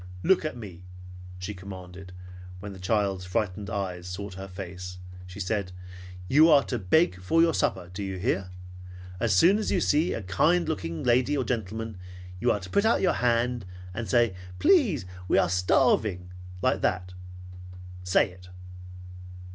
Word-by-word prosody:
"Look 190 - +4
at 155 -5 -4
me!" 95 -6 -10 0.5
she 95 +3 -5
commanded, 95 -1 -10
and 90 - -13 0.4
when 100 +1 -7
the 95 - -11
child's 95 -1 0
frightened 95 +1 -2
eyes 90 -3 -4
sought 95 +2 -6
her 95 +1 -7
face 90 -1 -8 0.3
she 90 +2 -10
said, 100 -1 -2 0.5
"You 155 - +6
are 145 -3 +6
to 125 - -3
beg 95 - +2
for 95 - +1
your 165 0 +5
supper, 90 0 -1
do 100 - -5
you 95 -1 -4
hear? 95 0 -1 0.7
As 110 -4 +2
soon 190 - +5
as 215 - -2
you 185 - +2
see 160 +1 +2
a 110 - -5
kind 155 - +2
looking 85 - -3
lady 125 +4 +2
or 130 - +1
gentleman, 110 -2 -4 0.4
you - - +2
are 105 - 0
to 90 - -9
put 200 - +3
out 225 +1 +3
your 185 - +3
hand, 120 0 +1 0.3
and 110 0 -5
say, 120 -1 +3 0.2
'Please, 255 - +3 0.2
we - - +3
are - - +3
starving,' 90 +1 +2 0.3
like - - +2
that. 90 0 -1 0.9
Say 90 0 +3
it!" 90 0 -15
100 Hz, 165 wpm, -27 LUFS, 90-125 Hz, 0.9 s, You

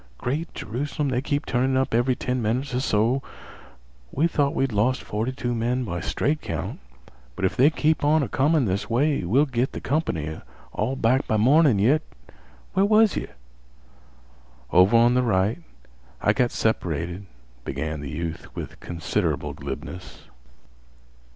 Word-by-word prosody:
Great 150 +7 -3
Jerusalem, 140 +5 -3
they 125 -1 0
keep 145 +1 -2
turnin' 130 +2 +1
up 130 -2 0
every 120 +2 +2
ten 125 0 -2
minutes 125 +5 -1
or 125 - +1
so! 120 +1 +1 0.9
We 150 - +1
thought 145 -4 +1
we'd 135 -1 +1
lost 110 +5 +1
forty 110 +5 -2
two 120 -1 -3
men 120 +2 0
by 85 -6 -4
straight 150 - -1
count, - - -4 0.6
but 95 - -1
if 95 - 0
they 130 +5 +6
keep 155 0 +1
on 150 +1 +4
a - - -2
comin' 145 +5 +2
this 100 +2 -2
way, 140 +1 +1
we'll 125 - +3
git 130 -2 -1
th' - - -7
comp'ny 80 - -2 0.3
all 135 - -1
back 130 +2 +1
by 110 - +1
mornin' 135 +2 +5
yit. 130 +10 +3 0.7
Where 190 - +3
was 215 0 +4
yeh?" - - -3 1.4
"Over 95 +6 +6
on 120 +1 +5
th' 125 0 +2
right. 105 - +1 0.6
I - - +2
got 125 -1 +2
separated"—began 80 - -3
the 70 - -6
youth 80 +2 -6
with - - -7
considerable 85 -2 -2
glibness. 90 0 -8
125 Hz, 150 wpm, -24 LUFS, 100-140 Hz, 1.4 s, they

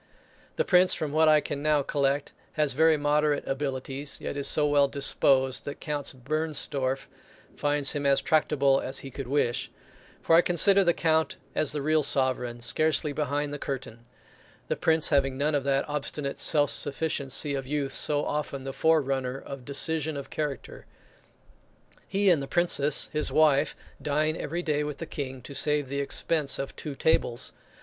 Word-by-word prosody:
The - - 0
Prince, 185 0 +4
from 155 -2 -3
what 160 +1 +3
I 155 -1 +5
can 145 - -4
now 150 -1 +2
collect, 140 +1 -1 0.2
has 150 -3 0
very 160 +2 +4
moderate 150 0 +1
abilities; 135 0 -4
yet - - -5
is 140 -1 0
so 150 - +2
well 145 -1 +4
disposed, 135 -1 +1
that 145 - -6
Count 145 -2 -3
Bernstorff 140 -3 -2 0.5
finds 145 -1 +1
him 145 -1 -1
as 140 0 +4
tractable 145 -4 +2
as 130 - -2
he 135 - -9
could 135 0 -7
wish; 130 -3 0 0.5
for 165 - +4
I 170 - +7
consider 195 +3 +3
the 175 -2 +2
Count 160 -2 +1 0.2
as 155 - 0
the 145 -2 -3
real 155 +1 +2
sovereign, 130 -4 0
scarcely 155 +4 +1
behind 145 0 -2
the 145 - -5
curtain; 130 -5 -6 0.7
the - - +1
Prince 160 -1 +2
having 135 -3 +1
none 150 +2 0
of 145 -2 0
that 140 +1 +1
obstinate 145 -1 -3
self 145 -2 +4
sufficiency 145 -1 0
of 135 -1 -4
youth, 140 -1 -2
so 145 -1 0
often 145 -2 -3
the 135 0 -5
forerunner 135 -5 +1
of 135 -2 -9
decision 155 +2 -2
of 140 - -8
character. 145 -5 -5 1.2
He 195 0 +2
and 160 -5 +2
the 135 - -5
Princess 150 -4 +1
his 150 0 -1
wife, 150 -2 +3 0.3
dine 155 +2 0
every 170 +3 -4
day 150 -2 0
with 150 -1 -5
the 165 - -6
King, 130 -5 -6
to 140 - -9
save 145 0 +1
the 140 +1 -3
expense 145 0 +1
of 135 - -5
two 150 -3 -6
tables. 120 -5 0
145 Hz, 170 wpm, -27 LUFS, 135-155 Hz, 1.2 s, I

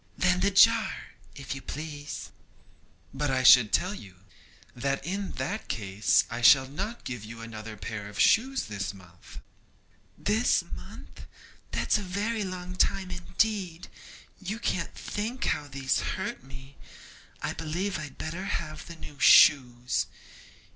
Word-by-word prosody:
'Then 180 -1 +2
the 200 - +3
jar, 225 +3 +4 0.2
if 135 -2 -5
you 135 - -7
please.' 150 0 -7 0.8
'But 145 +1 -1
I 130 -1 +1
should 125 -4 +8
tell 185 - +1
you, 100 - -11 0.6
that 135 +3 -2
in 195 +3 -3
that 210 +4 -4
case 105 -1 +2
I 120 +1 -5
shall 130 +2 +7
not 200 - -5
give 120 -5 -6
you 115 +2 -9
another 110 -1 -8
pair 105 0 -6
of 105 - -9
shoes 265 +4 +3
this 100 -1 -5
month.' 85 -9 -15 0.8
'This 220 +4 +2
month! - - -11 0.4
that's - - +1
a 185 -3 -7
very 215 +1 -1
long 185 -1 -6
time 190 0 +1
indeed! 180 0 -2 0.5
You 195 +4 -4
can't 185 -7 -2
think 230 +5 -4
how 145 - -1
these 135 -1 -1
hurt - - -4
me. 135 0 -12 0.7
I - - -1
believe 170 +3 -3
I'd 150 -3 -8
better 170 +5 -5
have 155 -6 -4
the 170 - -9
new 145 -3 -12
shoes. 125 -4 +5
155 Hz, 140 wpm, -28 LUFS, 125-195 Hz, 0.8 s, should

